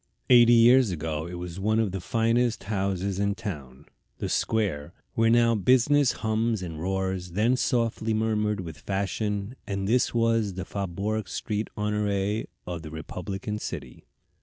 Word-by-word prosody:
Eighty 120 -1 +8
years 120 +1 +6
ago 80 -2 -3
it 90 - -7
was 90 +1 -6
one 110 +3 +1
of 110 -4 +1
the 95 0 -4
finest 115 +3 +1
houses 95 -1 -1
in 100 0 +1
town. 75 - -7 0.3
The - - -3
Square, 90 -9 -1 0.2
where 115 0 +3
now 115 0 +4
business 130 +6 +4
hums 110 -2 -1
and 80 -3 -6
roars, 95 -1 -2
then 110 +6 +3
softly 115 -3 0
murmured 105 -2 0
with 80 -4 -8
fashion, 100 - -2
and 100 -2 -2
this 120 +4 +2
was 115 -4 +1
the 95 0 -4
Faubourg 100 +3 -3
St. 105 0 -3
Honoré 105 0 -1 0.2
of 85 -2 -5
the 80 - -8
republican 95 +6 -5
city. 70 - -7
105 Hz, 150 wpm, -26 LUFS, 90-115 Hz, 0.3 s, Eighty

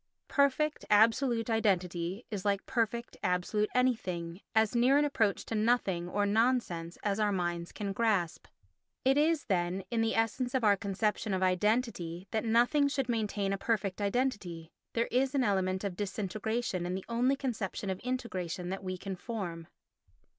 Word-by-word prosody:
Perfect, 285 +2 +2
absolute 230 +2 +4
identity 185 -3 0
is 200 -3 -3
like 200 -1 0
perfect, 235 0 -1
absolute 180 +4 0
anything—as 220 -2 0
near 250 +4 +5
an 295 - +4
approach 225 -8 +1
to - - -5
nothing, 210 -6 +1
or 205 +2 +1
nonsense, 205 -6 +1
as 205 0 0
our 210 -1 +2
minds 175 -2 -2
can 200 -2 -4
grasp. 200 -6 0 0.6
It 265 +1 +5
is, 310 +1 +2
then, 185 -1 0
in 230 -1 +1
the 225 0 +1
essence 245 +3 0
of 255 - +1
our 205 -2 +5
conception 205 0 -1
of 190 - 0
identity 185 -2 0
that 220 - 0
nothing 245 +6 +4
should 270 -3 -1
maintain 210 -4 0
a 195 - -3
perfect 200 -3 -1
identity; 200 -7 -1 0.2
there 230 0 +1
is 260 +2 +1
an 270 - +3
element 190 -3 0
of 195 -3 -3
disintegration 205 -1 -2
in 180 - -2
the 190 - -5
only 245 +3 +2
conception 220 -7 -3
of 190 - -4
integration 185 -9 -3
that 195 +1 -4
we 185 -1 -3
can 195 +1 -5
form. 180 -6 -5
210 Hz, 160 wpm, -31 LUFS, 185-235 Hz, 0.6 s, near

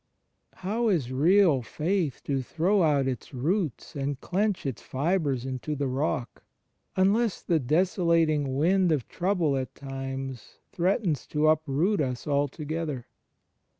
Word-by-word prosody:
How 225 +5 0
is 150 - 0
real 160 +1 +4
faith 160 - -2
to 135 -2 -1
throw 180 +10 +1
out 145 -5 +3
its 130 +1 -4
roots 160 - -1
and 140 -1 -2
clench 200 +2 -1
its 135 -5 -3
fibres 140 -3 -1
into 135 +3 -3
the 140 0 -1
Rock, 130 -2 -2 0.5
unless 200 +3 +2
the 165 -2 +2
desolating 160 -2 +2
wind 180 +4 +3
of 145 -6 0
trouble 175 -6 0
at 130 -1 -3
times 135 -2 -6
threatens 180 - 0
to 150 0 +1
uproot 155 +5 +2
us 125 -3 -3
alto 145 +1 -1
gether? 150 -5 -3
150 Hz, 130 wpm, -27 LUFS, 135-180 Hz, 0.5 s, real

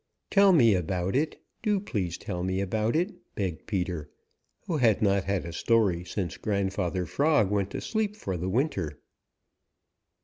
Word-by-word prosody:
"Tell 200 -1 +6
me 120 - +6
about 90 +2 -1
it. 150 +3 0 0.2
Do 210 -3 +2
please 100 - -3
tell 90 - -4
me 95 +1 -1
about 110 +5 0
it," 180 +6 +1 0.2
begged 95 -5 -3
Peter, 90 -7 -2 0.6
who 165 - -1
had 115 -7 +4
not 100 -2 +2
had 100 -3 -1
a 85 - -6
story 100 -4 +2
since 90 -1 -3
Grandfather 95 -3 -1
Frog 140 - +2
went 100 -1 +1
to - - -5
sleep 215 -2 -1
for 95 - -4
the 90 +2 -2
winter. 95 - -1
100 Hz, 160 wpm, -28 LUFS, 90-130 Hz, 0.6 s, Tell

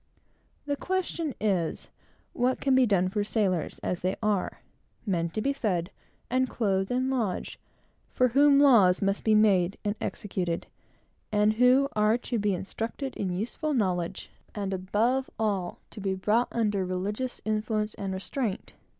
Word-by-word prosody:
The 285 0 -1
question 345 -4 -2
is, 190 -6 -1 0.4
what 250 +1 +1
can 270 - +2
be 260 -1 +5
done 190 -3 +2
for 205 +2 -1
sailors, 195 -6 0
as 180 - -1
they 185 +2 -1
are, 210 -3 0 0.4
men 170 -5 0
to 215 - -3
be 275 +5 +1
fed, 185 -10 -1 0.4
and 255 +1 +1
clothed, 195 -4 0
and 255 +1 0
lodged, 225 -8 -2 0.5
for 255 0 +2
whom 280 +3 +5
laws 220 -11 +6
must 195 0 0
be 220 -1 +4
made 195 -4 +3
and 205 - +1
executed, 180 -5 -3 0.7
and 210 0 +3
who 250 +4 +4
are 215 +2 +3
to 240 -1 -3
be 205 -2 +1
instructed 225 +8 -5
in 180 -3 -2
useful 275 +8 -2
knowledge, 185 -5 -1 0.2
and, 200 -2 -2
above 220 +8 0
all, 200 -5 -1
to 210 - -9
be 190 -1 -1
brought 215 +6 +2
under 210 -4 0
religious 200 +7 -3
influence 215 0 -1
and 195 -1 -4
restraint? 195 +3 -3
210 Hz, 150 wpm, -28 LUFS, 190-245 Hz, 0.7 s, laws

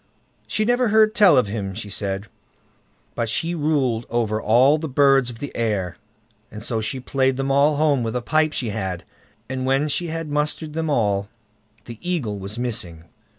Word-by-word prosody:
She 215 - 0
never 245 +1 +2
heard 215 0 +4
tell 205 - +6
of 125 - +4
him 100 -2 -4
she 105 -1 -6
said; 100 0 -2 0.9
but 115 -1 -2
she 165 +10 -1
ruled 140 -8 0
over 110 -2 0
all 130 +7 +4
the 160 -1 -4
birds 135 -2 +4
of 120 - -8
the 145 +4 -7
air, 100 -6 -1 0.5
and 105 0 -9
so 115 -1 -1
she 130 +5 -3
played 130 0 0
them 135 0 -1
all 145 +2 +4
home 145 -3 +2
with 115 0 -3
a 125 - 0
pipe 155 +2 +2
she 125 -6 -2
had, 95 -3 -3 0.4
and 130 0 -3
when 135 +3 +1
she 175 +4 -1
had 165 -1 -4
mustered 150 +1 -2
them 160 0 -2
all, 100 -7 +1 0.6
the 115 -2 -9
Eagle 140 - -2
was 100 +3 -6
missing. 105 -10 -3
130 Hz, 185 wpm, -22 LUFS, 110-150 Hz, 0.9 s, tell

